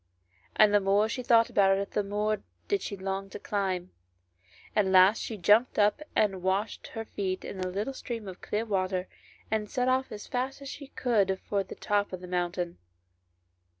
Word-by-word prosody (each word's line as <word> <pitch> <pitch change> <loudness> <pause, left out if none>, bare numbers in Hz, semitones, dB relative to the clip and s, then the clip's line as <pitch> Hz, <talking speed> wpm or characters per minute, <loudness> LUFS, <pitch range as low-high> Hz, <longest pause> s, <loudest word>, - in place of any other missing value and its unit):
And 210 -1 +6
the 205 - +6
more 200 +2 +3
she 250 +3 -3
thought 230 -2 +4
about 195 -1 +4
it 200 0 -3
the 210 - +1
more 210 +1 -1 0.3
did 405 -1 +1
she 200 - -5
long 195 +1 -3
to - - -7
climb. 190 -3 -2 0.8
At 205 -2 +3
last 190 +3 +6
she 220 - -4
jumped 210 +7 +4
up 210 +7 +3
and 195 -3 +2
washed 190 +4 -1
her 225 -1 -6
feet 185 -3 -3
in 190 - -6
a 185 - -1
little 205 +8 -3
stream 230 -5 -6
of 185 -1 -8
clear 215 +2 -2
water, 185 -3 -1 0.4
and 215 -1 0
set 250 -1 0
off 260 +1 +1
as 210 - -7
fast 260 +2 -2
as 275 -1 -8
she 280 0 -8
could 205 -8 +1
for 200 -1 +1
the - - -9
top 205 -1 0
of 185 - -5
the 180 - -8
moun 175 -1 0
tain. 175 -1 -4
205 Hz, 195 wpm, -29 LUFS, 190-220 Hz, 0.8 s, And